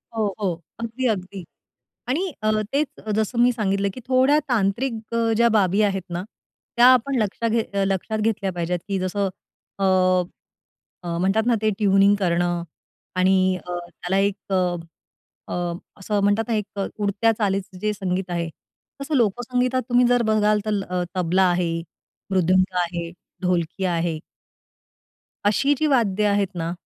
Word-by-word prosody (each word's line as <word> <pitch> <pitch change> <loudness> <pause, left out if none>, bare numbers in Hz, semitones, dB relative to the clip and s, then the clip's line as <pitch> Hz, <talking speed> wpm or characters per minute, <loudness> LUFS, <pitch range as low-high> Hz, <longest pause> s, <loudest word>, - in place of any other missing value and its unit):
हो, 210 -3 0
हो. 180 -5 -2 0.2
अगदी-अगदी. 220 -6 -2 0.7
आणि 350 +9 0
अ, 215 - +2 0.2
तेच 285 +1 +1 0.3
जसं 220 +2 -1
मी 250 +1 +5
सांगितलं 200 -3 0
की - - -8
थोड्या 260 +3 +4
तांत्रिक 230 +2 +1 0.2
अ, 230 -1 +2
ज्या 235 +1 +5
बाबी 195 +1 +2
आहेत 195 -2 +1
ना, 175 +1 -3 0.5
त्या 240 +1 +7
आपण 255 +2 +2
लक्षात 215 +3 -2
घेत 225 -2 -1
अ, 195 - +2
लक्षात 195 +3 -1
घेतल्या 210 -3 0
पाहिजेत 175 0 -2
की 195 -1 0
जसं 195 +2 -1 0.5
अ, 195 - 0 1.2
अ, 170 -1 -3
म्हणतात 195 +5 +2
ना 240 - +4
ते 215 - +3
ट्यूनिंग 200 -1 +4
करणं 175 -1 +1 0.5
आणि 185 0 +3
अ, 180 -1 -6
त्याला 190 +3 -2
एक 200 0 -1
अ, 180 -2 +1 0.7
अ, 175 -1 -2 0.3
असं 205 +1 -1
म्हणतात 205 +2 +2
ना 230 - +1
एक 210 -1 -4
अ, 195 - 0
उडत्या 205 +2 +2
चालीचं 195 -3 -1
जे 210 +3 0
संगीत 190 -2 -3
आहे. 170 -1 -2 0.5
तसं 275 +2 -3
लोकसंगीतात 250 +3 +1
तुम्ही 245 0 +4
जर 245 0 +3
बघाल 210 0 +3
तर 210 -2 0
अ, 180 0 0
तबला 180 +1 +2
आहे 175 -2 0 0.5
मृदुंका 185 0 +2
आहे 170 -1 -4 0.3
ढोलकी 180 0 -1
आहे. 170 -2 0 1.3
अशी 275 +8 +3
जी 310 - +2
वाद्य 215 -7 +2
आहेत 200 -1 +2
ना, 165 -1 -2
200 Hz, 150 wpm, -23 LUFS, 185-225 Hz, 1.3 s, त्या